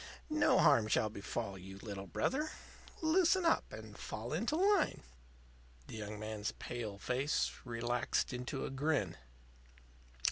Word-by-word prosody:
No 310 -1 +4
harm 140 -9 +6
shall 110 0 +2
befall 100 -1 -4
you, 95 +1 -9
Little 100 -1 -6
Brother. 280 - 0 0.5
Loosen 350 +2 +4
up 330 - +3
and 110 -1 -9
fall 115 +5 -5
into 225 - 0
line." 395 +3 +3 0.8
The - - -9
young 105 -1 -5
man's 110 0 -3
pale 110 -5 -5
face 130 +7 +1
relaxed 120 +1 0
into 125 +3 -3
a - - -4
grin. 135 - +1
120 Hz, 130 wpm, -35 LUFS, 105-160 Hz, 0.8 s, harm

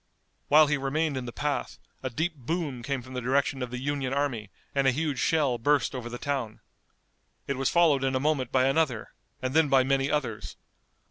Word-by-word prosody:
While 155 +1 +7
he 150 0 +1
remained 140 +2 -1
in 130 -1 -3
the 120 - -5
path 145 +3 -3 0.2
a 130 - -3
deep 160 +8 -1
boom 145 -1 -3
came 130 0 -3
from 130 +1 -11
the 125 - -3
direction 135 +1 +1
of 125 - -3
the 125 - -5
Union 135 0 -2
army 125 -8 -1 0.2
and 140 -1 +2
a - - +6
huge 145 -1 -2
shell 145 -7 +2
burst 145 +4 +2
over 125 -2 -5
the 120 - -6
town. 130 -6 -3 0.9
It 140 - -2
was 135 0 0
followed 160 -6 +4
in 135 0 +1
a - - +2
moment 140 -3 0
by 130 0 +3
another 135 -5 0 0.3
and 130 0 -1
then 160 -1 +4
by 135 -1 +5
many 135 +1 +1
others. 130 -8 -3
135 Hz, 205 wpm, -27 LUFS, 125-145 Hz, 0.9 s, While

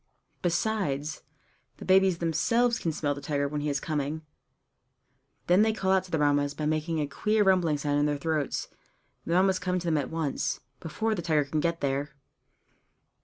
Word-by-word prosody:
Besides, 165 -6 -1 0.6
the - - -9
babies 190 -1 +4
themselves 230 +9 +1
can 165 - -1
smell 145 -2 -1
the 140 - -8
tiger 140 -1 -1
when 145 +1 -3
he 150 - -1
is 140 -1 0
coming; 150 +1 -3 1.2
then 180 +3 +4
they 220 0 +3
call 190 -3 0
out 190 -1 +3
to - - -14
their 160 -3 0
Mammas 145 0 +2
by 150 - -3
making 155 +1 0
a 150 - +1
queer 210 +10 +1
rumbling 180 -6 +3
sound 145 0 0
in 145 - +2
their 145 -1 0
throats, 155 -1 -2 0.6
and - - -4
the 170 - +4
Mammas 190 0 +3
come 180 0 -1
to 175 - -4
them 160 -3 +2
at 140 - -3
once, 160 -4 -2 0.2
before 220 +7 -2
the 185 - -3
tiger 155 -3 +1
can 150 +2 -2
get 170 +1 -1
there. 140 +1 -2
160 Hz, 190 wpm, -28 LUFS, 145-185 Hz, 1.2 s, babies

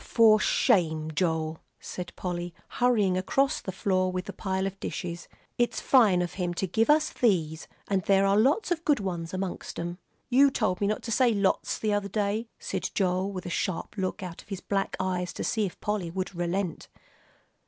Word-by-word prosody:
"For 220 -2 +5
shame, 160 -9 +2
Joel!" 160 -1 0 0.2
said 180 -1 -6
Polly, 175 -1 -4
hurrying 210 -7 +2
across 270 +8 +1
the 190 - -4
floor 185 -1 +1
with 185 0 -3
the - - -6
pile 190 -1 -2
of 195 0 -4
dishes; 170 -1 -5 0.3
"it's 240 - +1
fine 210 -9 +4
of 175 - -4
him 175 -1 -1
to 190 - -1
give 220 - +1
us 305 +1 +4
these. 165 -9 0 0.2
And 195 -2 +1
there 195 +1 +3
are 195 0 +3
lots 275 - +3
of 340 -1 0
good 295 -6 +3
ones 175 -4 -3
amongst 185 -1 -4
'em." 175 +2 -4 0.3
"You 270 +2 +6
told 215 -8 -1
me 200 - +2
not 215 - -1
to 230 - -4
say 240 0 +3
'lots,' 200 -1 +1
the 215 -1 0
other 205 -1 -1
day," 210 +3 -1
said 475 +1 -3
Joel, 185 0 +1
with 185 -2 -6
a 175 - -4
sharp 185 +2 -2
look 190 -1 -3
out 175 -2 -7
of - - -23
his 195 -3 -4
black 195 0 -1
eyes 180 -1 -1
to - - -4
see 220 -4 +1
if 180 - -11
Polly 205 -5 -2
would 185 +2 -4
relent. 175 +1 -2
190 Hz, 195 wpm, -28 LUFS, 180-215 Hz, 0.3 s, You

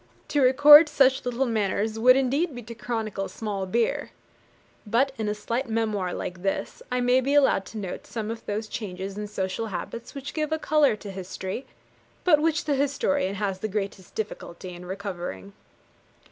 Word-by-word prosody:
To 290 - +2
record 290 +4 +9
such 270 -3 +3
little 245 +2 0
matters 215 -1 -1
would 255 +2 +7
indeed 270 +4 +1
be 245 - -7
'to 230 +2 -8
chronicle 220 -4 -3
small 200 -3 -4
beer.' 230 +5 0 0.7
But, 240 +6 +2
in 215 -1 -1
a 210 - -1
slight 235 +4 -3
memoir 215 -5 -1
like 175 0 -5
this, 195 +1 -2
I 250 0 +1
may 250 +1 +4
be 275 +3 0
allowed 270 -9 +4
to 220 - -9
note 195 -4 -6
some 220 -1 -4
of 230 - -7
those 215 +1 -2
changes 195 -4 -5
in 210 0 -4
social 195 +2 -3
habits 230 +5 -6
which 275 0 -6
give 305 -1 -2
a 315 - +1
colour 305 -5 +3
to 205 -1 -9
history, 190 +4 -6 0.6
but 310 -5 +5
which 320 0 +1
the 295 - +1
historian 280 -6 0
has 195 -2 -2
the 215 - -2
greatest 195 -2 -5
difficulty 185 -4 -6
in 175 +1 -10
recovering. 175 - -6
225 Hz, 175 wpm, -26 LUFS, 195-265 Hz, 0.7 s, record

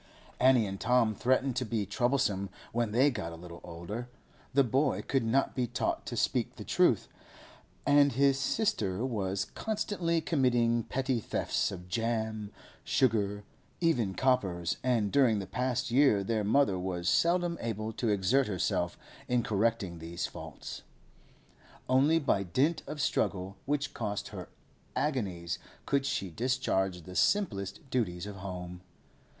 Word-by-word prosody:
Annie 130 -3 +5
and 95 -1 -5
Tom 120 -2 +3
threatened 130 +3 +1
to 130 - +1
be 110 -3 -1
troublesome 105 -3 0 0.2
when 120 -1 +1
they 130 +6 +4
got 85 -9 -4
a - - -7
little 85 +1 -10
older; 90 +9 -6 0.4
the 140 +1 +4
boy 135 +4 +1
could 135 -3 0
not 125 +5 +1
be 125 -2 0
taught - - -2
to - - -4
speak - - 0
the - - -8
truth, - - +3 0.8
and 145 -1 +5
his 135 +1 +3
sister 125 - 0
was 100 -5 -1
constantly 200 - -1
committing 120 -7 +2
petty 130 -2 -1
thefts 105 - -1
of 90 -2 -8
jam, 110 0 -2 0.3
sugar, 105 -5 +1 0.4
even 120 - +1
coppers; 95 -10 +1
and 115 -5 +1
during 130 -6 +4
the 100 - -3
past 125 +4 -1
year 125 -6 +4
their 110 +1 0
mother 105 -3 +3
was 90 -1 -3
seldom 170 - +3
able 110 -1 -3
to 115 +1 -1
exert 105 +7 +2
herself 95 -4 -1 0.3
in 125 -1 +2
correcting 105 -5 0
these 85 +1 -4
faults. - - -8 1.1
Only 135 +5 +4
by 140 -10 +2
dint 130 - +1
of 150 - -6
struggle 95 -7 0
which 145 0 -1
cost 105 -3 -3
her - - -8 0.5
agonies 95 - -1 0.3
could 140 -1 +1
she 95 -8 -2
discharge 95 -6 0
the 90 +2 -10
simplest 100 - 0
duties 95 -8 -1
of 105 -1 -7
home. 90 -2 -6
115 Hz, 145 wpm, -30 LUFS, 95-135 Hz, 1.1 s, Annie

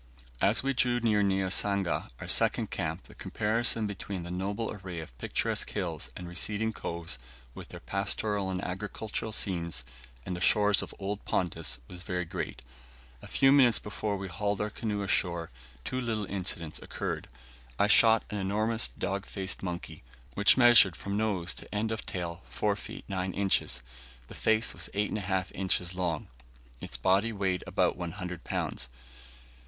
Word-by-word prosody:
As 105 +6 +4
we 135 0 +1
drew 120 -1 +2
near 110 -3 +3
Niasanga, 95 -1 +1
our - - -6
second - - +2
camp, - - -2
the - - -14
comparison 115 +1 +1
between 100 -2 -4
the 85 - -6
noble 100 +5 -2
array 95 -4 -6
of 80 -7 -9
picturesque - - -1
hills - - -3
and 90 - -7
receding 105 +5 -1
coves, 85 - -4 0.3
with - - -9
their - - -8
pastoral 100 0 -1
and 95 0 -2
agricultural 105 +4 -3
scenes, 85 - 0 0.4
and 90 - -3
the 90 - -6
shores 105 0 +4
of - - -5
old 100 +1 -3
Pontus, 80 -7 0
was 90 -1 -10
very 90 0 -2
great. 65 -5 -5 0.6
A - - -10
few 135 0 +4
minutes 130 -5 +6
before 105 0 -3
we 95 0 -5
hauled 100 +3 -1
our 105 0 -1
canoe 105 -2 -2
ashore, 85 -3 0 0.3
two 130 - -1
little 110 -4 -1
incidents 90 -5 -2
occurred. - - -4 0.5
I - - +4
shot 110 +1 +7
an 105 - -2
enormous 110 +4 +2
dog 100 +1 -3
faced 95 -1 -1
monkey, 90 -3 -5 0.3
which 100 +5 +6
measured 120 -7 +8
from 100 0 -4
nose 100 -5 0
to - - -9
end 110 +2 0
of 110 - -4
tail 85 -1 -4
4 105 -1 +1
feet 100 - -9
9 95 -1 -2
inches; 95 -11 +1 0.5
the - - -9
face 110 +1 +2
was - - -3
8 105 +1 0
1/2 95 -2 -1
inches 90 -2 0
long, 90 -4 -1 0.5
its - - -6
body 100 +5 +3
weighed 95 -4 0
about - - +2
100 90 0 -5
lbs. - - -2
100 Hz, 160 wpm, -30 LUFS, 90-105 Hz, 0.6 s, measured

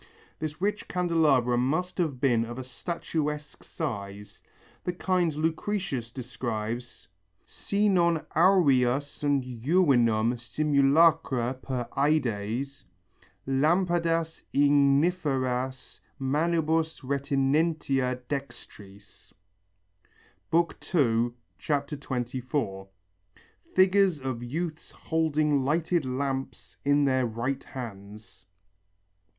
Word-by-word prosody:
This 155 0 -4
rich 205 +3 -1
candelabra 155 -9 +2
must 160 +9 -1
have 150 -7 -1
been 120 -4 +3
of 120 +1 -7
a 130 - -5
statuesque 150 +1 -4
style, 100 -9 -5 0.6
the 180 - -2
kind 180 -3 0
Lucretius 160 - -2
describes: 120 -5 -5 0.4
Si 205 +1 -1
non 170 -4 +2
aurea 140 -8 +4
sunt 145 -1 -1
juvenum 120 -4 +2
simulacra 140 -1 +3
per 130 -2 -4
ædes 135 -2 0 0.6
Lampadas 165 +3 +1
igniferas 140 -3 +1 0.2
manibus 160 +3 0
retinentia 140 -1 0
dextris 105 -8 -8 1.2
(II, 125 -8 +1 0.2
24). 130 -7 -3 0.9
(Figures 185 -3 +4
of 130 -3 -4
youths 155 +6 -4
holding 155 -3 0
lighted 160 +2 +1
lamps 135 +1 -4
in 145 0 +3
their 130 -2 +2
right 120 +4 -3
hands.) 105 -4 -10
140 Hz, 80 wpm, -27 LUFS, 125-160 Hz, 1.2 s, aurea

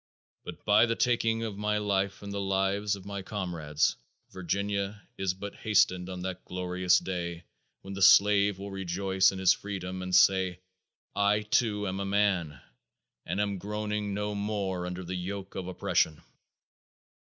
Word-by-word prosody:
But - - -10
by 110 +3 +5
the 115 - 0
taking 115 -2 +1
of 105 -3 -5
my 105 0 0
life 100 -1 -1
and 100 0 -6
the 100 - -2
lives 95 +1 0
of 100 -1 -12
my 100 -1 -5
comrades, 85 -7 -1 0.4
Virginia 100 +3 -2 0.2
is 95 -1 -1
but 100 +1 -7
hastening 95 -4 +2
on 90 -1 -6
that 95 -1 -5
glorious 90 0 +1
day, 85 -2 -4 0.4
when 95 - -7
the 100 - -5
slave 100 0 +6
will 100 +1 -7
rejoice 95 0 +1
in 95 - -7
his 95 -1 +5
freedom 95 -2 -5
and 90 -1 -1
say, 95 -1 +4 0.6
"I, 100 +1 +3
too, 105 -1 +1
am 95 +1 -3
a 100 - -2
man, 95 -8 +1 0.7
and 90 +4 -2
am 100 -2 -1
groaning 105 +1 -3
no 105 0 -2
more 100 -3 -2
under 90 +1 -5
the 90 +1 -5
yoke 95 +2 -5
of 95 -2 -5
oppression." 80 -4 0
95 Hz, 160 wpm, -29 LUFS, 90-105 Hz, 0.7 s, slave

